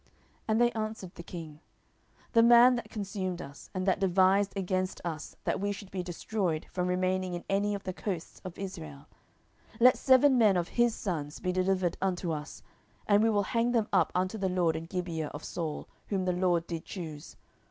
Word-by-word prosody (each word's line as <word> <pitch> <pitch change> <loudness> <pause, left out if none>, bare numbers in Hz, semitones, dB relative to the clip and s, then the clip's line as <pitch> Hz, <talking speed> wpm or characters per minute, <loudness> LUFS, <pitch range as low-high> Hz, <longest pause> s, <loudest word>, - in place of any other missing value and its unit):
10:021:005 - - -32 0.4
And 220 +1 +2
they 240 0 +4
answered 215 -5 -5
the - - -9
king, 165 -3 -9 0.7
The 230 - +6
man 240 +2 +8
that 240 - -4
consumed 195 -4 -4
us, 140 -2 -10
and 185 -1 -3
that 190 -2 +2
devised 190 +1 +3
against 185 0 -1
us 155 -3 -5
that - - -1
we 205 +1 -1
should 200 -1 -8
be 190 - -3
destroyed 175 -1 -2
from 180 -1 -1
remaining 185 0 0
in 175 - -6
any 205 +1 +1
of 200 - -7
the 185 - -4
coasts 180 -3 -5
of 185 -3 -8
Israel, 160 -7 -7 0.7
10:021:006 - - -17
Let 250 +1 +7
seven 260 0 +5
men 210 -5 +5
of 175 -1 -1
his 240 -1 +2
sons 155 -6 -4
be 185 - -1
delivered 185 -1 +1
unto 180 -2 -1
us, 150 -1 -6 0.4
and 205 0 +4
we 225 - +4
will 205 -2 +2
hang 235 +1 +2
them 225 -3 +2
up 180 -5 +3
unto 185 +4 0
the 190 -1 0
LORD 175 -3 +1
in 160 +1 -5
Gibeah 170 -4 -3
of 145 - -7
Saul, 160 -3 -4 0.2
whom 190 -3 -1
the 180 - +1
LORD 175 -2 +1
did 165 -2 -5
choose. 160 -4 -8
185 Hz, 200 wpm, -30 LUFS, 175-205 Hz, 0.7 s, man